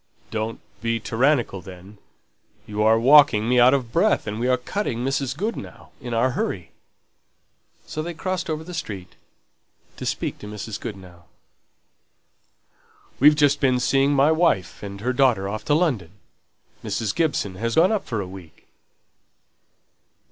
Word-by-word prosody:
"Don't 110 +1 -3 0.2
be 115 0 -1
tyrannical, 120 -3 +1
then. 95 +2 -13 0.7
You're 105 +1 +2
walking 130 -4 +6
me 125 +1 +3
out 125 +3 +6
of 125 -4 -3
breath, - - +2
and 105 +1 -4
we're 125 +1 +2
cutting 125 - -3
Mrs. 135 -1 -1
Goodenough, 195 - -5
in 120 - -6
our 120 +3 +2
hurry." 90 -7 -3 1.1
So 155 - -5
they 170 +1 -5
crossed 185 +1 -3
over 155 0 -3
the 180 +2 -9
street 100 - -6 0.8
to - - -5
speak - - -3
to 105 - -9
Mrs. 105 0 -6
Goodenough. 90 -5 -9 1.9
"We've 150 +3 +7
just 145 -1 +3
been 130 -3 +2
seeing 135 +3 +2
my 140 +3 +4
wife 160 - +1
and 100 -1 -8
her 125 +3 0
daughter 120 -7 +2
off 110 +2 -5
to 145 - +2
London. 135 - 0 0.7
Mrs. 110 -3 -2
Gibson 155 - 0
has 115 +2 -2
gone 180 +5 +5
up 215 -3 -1
for 115 -3 -2
a 95 - -6
week!" 90 -4 -13
120 Hz, 145 wpm, -23 LUFS, 105-145 Hz, 1.9 s, We've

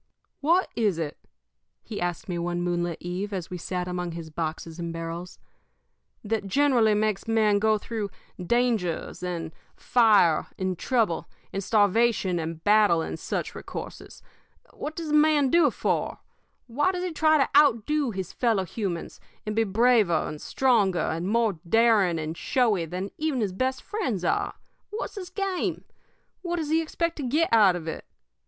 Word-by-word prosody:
"What 340 +6 +3
is 210 -7 +1
it," 155 -3 -4 0.6
he 215 - -6
asked 175 -1 -3
me 175 -2 -3
one 175 0 -2
moonlit 175 -1 -1
eve, 180 +4 -4
as 185 -4 -5
we 180 - -5
sat 180 +1 -3
among 180 -1 -3
his 165 -1 -7
boxes 160 +1 -4
and 170 -1 -3
barrels, 165 +2 -6 0.9
"that 215 -1 -2
generally 240 -2 +3
makes 215 0 0
men 215 -2 +3
go 215 +1 +3
through 210 -1 -4 0.3
dangers, 220 -7 0
and 170 -3 -4 0.2
fire, 210 -9 +4
and 185 -1 -1
trouble, 220 -4 0 0.2
and 195 - -2
starvation, 205 -3 +2
and 160 0 -5
battle, 205 -6 +4
and - - -5
such - - -3
recourses? - - -8 0.5
What 305 +1 -6
does 330 -2 -5
a - - 0
man 300 -3 +4
do 340 -3 +5
it - - +3
for? - - -1 0.5
Why 290 +10 +1
does 360 -1 -4
he 365 - -2
try 315 0 +3
to 275 - +3
outdo 290 0 +4
his 190 -5 -5
fellow 225 -6 +1
humans, 185 -4 -4 0.3
and 215 0 -3
be 225 0 +2
braver 215 -4 +3
and 150 0 -7
stronger 220 -9 +2
and 165 +3 -3
more 220 -4 +1
daring 220 -6 +4
and 155 +1 -4
showy 215 -5 +1
than 180 +4 -5
even 305 -4 0
his 205 -5 -1
best 260 +6 -1
friends 250 - -2
are? - - 0 0.3
What's 425 +3 -5
his 370 -4 -7
game? 385 -1 -2 0.6
What 350 -1 -2
does 315 -3 -3
he 325 +1 +3
expect 335 +1 -2
to 295 - -4
get 295 +3 +1
out 205 -5 +6
of 165 -2 -6
it? 160 - -5
210 Hz, 165 wpm, -26 LUFS, 175-260 Hz, 0.9 s, out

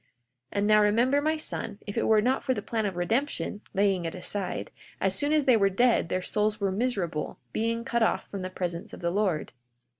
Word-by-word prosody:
42:11 - - -40 0.5
And 200 0 +1
now 215 0 +6
remember, 240 +7 +3
my 310 +2 +1
son, 220 -8 -4
if 205 - -6
it 230 - +1
were 220 -1 +5
not 260 +3 +1
for 260 -2 +1
the - - -4
plan 220 -2 -1
of 190 - -4
redemption, 220 +3 -1
(laying 195 -2 +2
it 165 - -3
aside) 185 +1 -3 0.3
as 190 -1 +2
soon 290 +9 0
as 305 -2 +3
they 255 - +6
were 200 -3 +4
dead 230 -2 +2
their 185 +1 -1
souls 210 +2 0
were 200 -2 0
miserable, 195 -8 -2 0.2
being 230 +1 -1
cut 235 -3 0
off 225 - +1
from 200 - -4
the 185 - -4
presence 175 -2 -4
of - - -8
the 170 0 0
Lord. 190 -5 0
210 Hz, 220 wpm, -28 LUFS, 190-235 Hz, 0.5 s, now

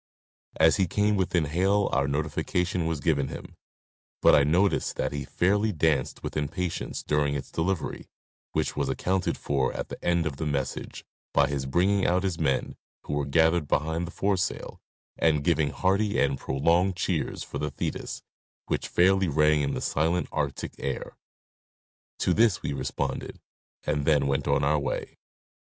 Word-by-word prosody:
As 80 +3 +5
he 95 -2 +2
came 105 +4 +1
within 90 -4 +1
hail 95 +6 +2
our 70 +1 +1
notification 80 +4 -1
was 80 -3 -2
given 70 -4 +1
him, - - -9 0.7
but - - +7
I 70 - +6
noticed 90 +7 +2
that - - -1
he 70 -1 -4
fairly 105 +4 +1
danced 80 -5 0
with - - -5
impatience 80 +4 -3
during 75 -1 +1
its 70 - -5
delivery, 90 +1 -2 0.5
which - - -1
was 70 -2 -1
accounted 95 +7 0
for 70 -2 0
at - - -5
the - - -9
end 85 -1 +2
of 70 -4 -3
the 80 - -2
message 70 -3 -3 0.3
by - - +5
his 70 -2 -2
bringing 95 +7 +2
out 90 +2 +2
his 95 -4 -2
men, 70 -4 0 0.3
who - - -5
were 75 -1 -1
gathered 80 +2 +3
behind 80 +4 0
the - - -8
foresail, 95 -2 -2 0.4
and 75 -3 +3
giving 80 -2 +2
hearty 100 +5 +1
and 70 -1 +1
prolonged 85 +8 +1
cheers - - -2
for - - -6
the 75 - -1
Thetis 70 - -4 0.4
which - - -2
fairly 95 +1 +3
rang 75 0 +3
in 70 - -1
the - - -3
silent 80 +4 0
Arctic - - -3
air. 70 -1 -4 1.0
To - - +1
this 110 -5 +3
we - - -2
responded 65 -2 -3 0.4
and 75 -1 -1
then 75 -3 +3
went 70 +1 0
on 70 - +2
our 75 +1 +3
way. 70 - -4
80 Hz, 165 wpm, -27 LUFS, 70-90 Hz, 1.0 s, but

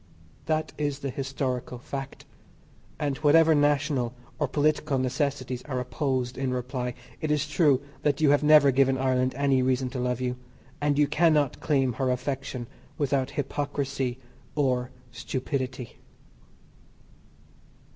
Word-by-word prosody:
That 155 -1 0
is 145 -2 -1
the 135 - -1
historical 130 -2 -3
fact, 135 +2 -7 0.7
and 140 -2 -1
whatever 160 +2 +5
national 145 -4 +1 0.2
or - - +1
political 150 -1 +1
necessities 130 -1 -1
are 130 -4 -2
opposed 130 -1 -2
in 135 -1 -1
reply, 125 0 -3 0.3
it 155 - -1
is 150 0 +1
true 150 -3 +3 0.2
that 145 -2 +1
you 150 -3 +5
have 145 - +4
never 150 -2 +7
given 135 0 +3
Ireland 130 -1 +1
any 135 -1 +2
reason 130 0 0
to 130 - -4
love 125 0 -1
you, 125 -1 -2 0.4
and 145 -1 +1
you 150 - +5
cannot 150 -2 +2
claim 135 -5 +1
her 130 +3 -1
affection 130 -1 -3 0.3
without 140 -2 0
hypocrisy 140 -2 -2 0.4
or 130 -4 +1 0.2
stupidity. 125 +1 -4
135 Hz, 130 wpm, -27 LUFS, 125-145 Hz, 0.7 s, never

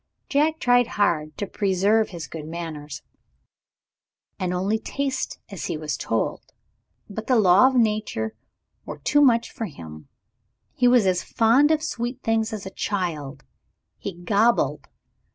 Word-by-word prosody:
Jack 305 +3 +2
tried 245 -3 +3
hard 155 -7 +1
to 205 - -2
preserve 200 +3 +1
his 170 -4 -7
good 155 -2 -8
manners, 160 -3 -7 1.4
and 185 -1 -1
only 195 +5 0
taste 270 +3 -3
as 195 -5 -6
he - - -3
was 155 -1 -3
told. 115 - -2 0.7
But 220 +2 -7
the 255 - +3
laws 215 +5 +5
of - - +5
Nature 210 - -1 0.5
were 150 - -7
too 290 - +2
much 235 -4 +3
for 225 - -4
him. 80 - -11 0.7
He 250 - +2
was 245 -4 +5
as 185 -1 +2
fond 240 +6 +3
of 315 -1 +2
sweet 245 -3 -4
things 225 0 +1
as 210 -3 -6
a 190 - -6
child 155 -10 -3 0.6
he 200 - -5
gobbled. 210 +7 +1
205 Hz, 145 wpm, -24 LUFS, 165-235 Hz, 1.4 s, laws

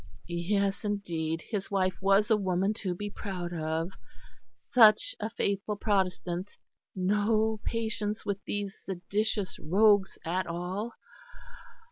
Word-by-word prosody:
Yes, 195 +4 0
indeed, 165 -6 -2
his 205 -4 -4
wife 185 -2 +1
was 195 +3 +4
a - - +7
woman 190 0 +1
to 190 -4 -3
be 205 +3 -4
proud 180 -5 -5
of; 160 +2 -2 0.6
such 230 - +5
a 215 - -2
faithful 205 -2 -1
Protestant; 190 -2 -1 0.4
no 210 +3 +2
patience 220 -2 -2
with 200 -1 -2
these 205 -1 -3
seditious 195 +2 -2
rogues 200 +4 +4
at 180 +2 -1
all. 180 +7 -3
200 Hz, 115 wpm, -29 LUFS, 180-210 Hz, 0.6 s, a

